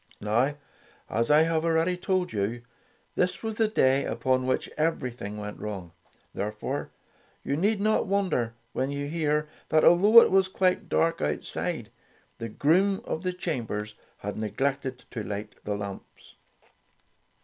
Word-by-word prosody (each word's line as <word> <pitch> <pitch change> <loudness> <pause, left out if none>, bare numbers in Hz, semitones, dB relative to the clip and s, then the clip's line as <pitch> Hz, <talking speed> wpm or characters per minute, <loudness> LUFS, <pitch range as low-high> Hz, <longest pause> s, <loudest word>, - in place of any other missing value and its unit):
Now, 120 +7 +1 0.6
as 115 +1 +1
I 150 +1 +6
have 160 -1 +1
already 165 +2 +2
told 185 -4 -1
you, 110 +4 -2 0.5
this 180 +1 0
was 220 0 -2
the 220 +1 +2
day 135 -10 +3
upon 130 -1 0
which 130 - 0
everything 125 -9 -2
went 105 0 -6
wrong. 95 -5 -6 0.4
Therefore, 105 +1 -3 0.5
you 140 - -1
need 200 +7 +1
not 215 0 +2
wonder 185 - 0 0.2
when 130 +1 -1
you 140 0 -3
hear 150 -1 0 0.2
that, 155 0 +4
although 205 +7 +8
it - - +3
was 190 0 +4
quite 185 -1 0
dark 165 0 +1
out 75 0 -1
side, - - -4 0.5
the 115 - -4
groom 185 - +2
of 160 - -3
the 185 0 -1
chambers 115 - -3 0.2
had 100 0 -5
ne 110 -1 -2
glected 135 +1 -1
to 115 - -4
light 105 +1 -5
the 105 - -1
lamps. 100 -1 -9
140 Hz, 150 wpm, -27 LUFS, 110-180 Hz, 0.6 s, although